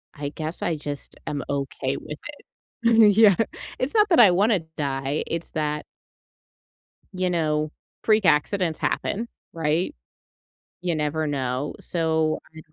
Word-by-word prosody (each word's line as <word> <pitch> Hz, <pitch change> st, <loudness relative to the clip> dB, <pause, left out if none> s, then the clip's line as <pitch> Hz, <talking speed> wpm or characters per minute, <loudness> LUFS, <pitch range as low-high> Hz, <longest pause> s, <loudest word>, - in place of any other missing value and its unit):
I 145 Hz, -1 st, -4 dB
guess 155 Hz, +2 st, -5 dB
I 170 Hz, -, 0 dB
just 145 Hz, -1 st, -6 dB
am 145 Hz, -3 st, -2 dB
okay 140 Hz, -1 st, -2 dB
with 150 Hz, -, -7 dB, 0.7 s
it. 225 Hz, -3 st, +6 dB
Yeah. 210 Hz, -4 st, +7 dB, 0.4 s
It's 255 Hz, +3 st, -2 dB
not 425 Hz, -1 st, +5 dB
that 335 Hz, -, +6 dB
I 210 Hz, -, +9 dB
wanna 200 Hz, +1 st, +3 dB, 0.2 s
die 135 Hz, 0 st, -1 dB
it's 165 Hz, 0 st, -4 dB
that 150 Hz, -1 st, -1 dB, 1.3 s
you 185 Hz, 0 st, 0 dB
know, 155 Hz, -3 st, 0 dB, 0.3 s
freak 215 Hz, -2 st, +3 dB
accidents 165 Hz, +2 st, +2 dB
happen 230 Hz, +4 st, -1 dB, 0.2 s
right? 165 Hz, -, 0 dB, 0.9 s
You 175 Hz, -1 st, -1 dB
never 155 Hz, +1 st, -1 dB
know 135 Hz, -1 st, -2 dB
so, 160 Hz, -2 st, 0 dB, 0.2 s
I'd 160 Hz, -, -10 dB
160 Hz, 130 wpm, -24 LUFS, 150-185 Hz, 1.3 s, I